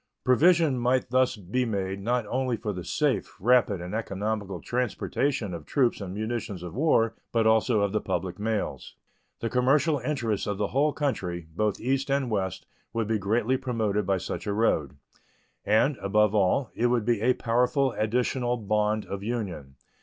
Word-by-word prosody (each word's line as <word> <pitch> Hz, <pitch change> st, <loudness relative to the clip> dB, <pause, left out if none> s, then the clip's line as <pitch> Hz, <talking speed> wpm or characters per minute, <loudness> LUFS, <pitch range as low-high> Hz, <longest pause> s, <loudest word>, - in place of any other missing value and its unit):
Provision 155 Hz, +1 st, +4 dB
might 125 Hz, 0 st, +1 dB
thus 130 Hz, 0 st, +3 dB
be 105 Hz, +5 st, -2 dB
made 100 Hz, -4 st, -2 dB
not 120 Hz, +2 st, 0 dB
only 125 Hz, +2 st, -1 dB
for 105 Hz, -3 st, -3 dB
the 90 Hz, -1 st, -6 dB
safe, -, -, -1 dB
rapid, 115 Hz, -3 st, +3 dB
and 90 Hz, +2 st, -6 dB
economical 105 Hz, -3 st, -3 dB
transportation 125 Hz, -, -1 dB
of 85 Hz, -3 st, -6 dB
troops 125 Hz, -6 st, +1 dB
and 95 Hz, -2 st, -5 dB
munitions 105 Hz, -3 st, -4 dB
of 90 Hz, -, -7 dB
war, 115 Hz, -4 st, +2 dB, 0.2 s
but 115 Hz, -1 st, +2 dB
also 110 Hz, 0 st, +3 dB
of 100 Hz, -1 st, +1 dB
the 110 Hz, -, 0 dB
public 90 Hz, +2 st, -3 dB
mails. 110 Hz, -1 st, -3 dB, 0.5 s
The 115 Hz, -, -1 dB
commercial 140 Hz, +4 st, +3 dB
interests 120 Hz, -6 st, -2 dB
of 100 Hz, -1 st, -2 dB
the 105 Hz, -1 st, -1 dB
whole 145 Hz, +3 st, +2 dB
country, 90 Hz, -, -2 dB
both 105 Hz, +1 st, 0 dB
East 135 Hz, +2 st, -1 dB
and 135 Hz, -3 st, 0 dB
West, 95 Hz, -4 st, -2 dB, 0.3 s
would 115 Hz, -1 st, 0 dB
be 110 Hz, -1 st, 0 dB
greatly 115 Hz, +6 st, +1 dB
promoted 110 Hz, -5 st, -1 dB
by 95 Hz, -1 st, +2 dB
such 95 Hz, -, -5 dB
a 100 Hz, -, 0 dB
road, 80 Hz, -10 st, +1 dB, 0.7 s
and, 125 Hz, +6 st, +3 dB
above 105 Hz, +1 st, +2 dB
all, 105 Hz, +5 st, +2 dB
it 120 Hz, -, +1 dB
would 120 Hz, -3 st, +1 dB
be 115 Hz, -3 st, +1 dB
a 125 Hz, +3 st, +4 dB
powerful 125 Hz, +3 st, +1 dB
additional 120 Hz, +2 st, 0 dB
bond 105 Hz, 0 st, 0 dB
of 100 Hz, 0 st, -5 dB
union. 100 Hz, -, -4 dB
110 Hz, 170 wpm, -27 LUFS, 100-125 Hz, 0.7 s, Provision